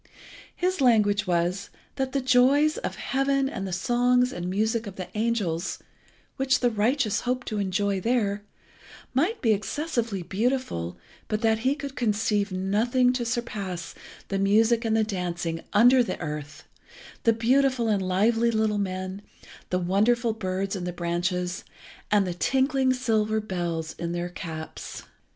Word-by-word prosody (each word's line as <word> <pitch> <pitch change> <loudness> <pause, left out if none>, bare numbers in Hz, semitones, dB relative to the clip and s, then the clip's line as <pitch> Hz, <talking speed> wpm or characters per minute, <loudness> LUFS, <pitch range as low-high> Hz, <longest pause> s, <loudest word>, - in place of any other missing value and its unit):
His 365 -2 0
language 215 -5 +3
was 180 +3 0 0.3
that 265 -1 -2
the 275 - 0
joys 265 +4 +4
of - - -4
heaven 275 0 0
and 195 -7 -4
the - - -5
songs 245 +6 +2
and 175 -4 -4
music 220 +3 0
of 195 - -8
the 185 - -6
angels, 210 -7 -1 0.6
which 265 -1 +2
the 245 -1 +3
righteous 220 +1 +1
hope 250 +1 -2
to 215 -2 -3
enjoy 200 0 0
there, 210 -3 0 0.7
might 335 - 0
be 225 -3 +5
excessively 230 - -2
beautiful, 190 - -2 0.3
but 215 0 -1
that 220 -1 +2
he 260 +5 +1
could 280 -2 -7
conceive 210 -3 0
nothing 225 +7 +2
to 250 -1 -1
surpass 205 -7 -4 0.4
the 195 - -1
music 220 +4 +3
and 220 0 +2
the 220 - +3
dancing 175 -5 -3
under 245 +4 +6
the 220 -6 -2
earth, 150 -2 -6 0.6
the 230 - +4
beautiful 250 +2 +2
and 205 -3 +2
lively 220 +6 +2
little 220 -2 +1
men, 185 0 -3 0.5
the 180 - +1
wonderful 215 +6 +2
birds 195 -1 -2
in 185 - -4
the 180 - -2
branches, 180 +1 -2 0.5
and 205 -2 +3
the 180 - -2
tinkling 265 +6 +2
silver 220 -4 +1
bells 175 -6 -3
in 170 0 -3
their 175 0 -3
caps. 160 -2 -7
215 Hz, 150 wpm, -26 LUFS, 185-245 Hz, 0.7 s, under